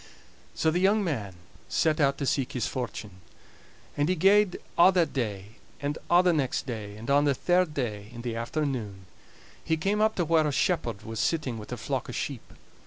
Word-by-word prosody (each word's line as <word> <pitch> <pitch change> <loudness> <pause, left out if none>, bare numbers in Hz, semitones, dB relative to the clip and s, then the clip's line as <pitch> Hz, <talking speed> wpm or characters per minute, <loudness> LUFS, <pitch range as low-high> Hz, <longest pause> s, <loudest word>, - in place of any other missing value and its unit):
So 160 - +2
the 175 - 0
young 200 +3 +3
man 110 - -3 0.3
set 155 -1 +1
out 140 -1 +3
to 140 - -2
seek 135 -1 0
his 125 - -1
fortune. 105 -6 -5 0.7
And 145 +3 +1
he 185 - +2
gaed 195 +2 +4 0.2
a' 180 +2 +7
that 175 -3 +1
day, 105 -4 -4 0.2
and 145 +1 -3
a' 175 +1 +6
the 180 -1 +4
next 140 -5 -1
day; 105 -5 -6
and 115 +2 -9
on 145 +1 +4
the 140 -2 +2
third 175 +1 +1
day, 105 -6 -3
in 120 -1 -9
the 120 -2 -3
afternoon, 115 -6 -3 0.6
he 160 -1 0
came 200 +6 0
up 220 0 +3
to 175 - 0
where 160 -1 +3
a - - 0
shepherd 135 - 0
was 110 -1 -6
sitting 130 -4 0
with 105 - -10
a - - -3
flock - - -3
o' - - -5
sheep. - - -5
140 Hz, 200 wpm, -27 LUFS, 115-170 Hz, 0.7 s, a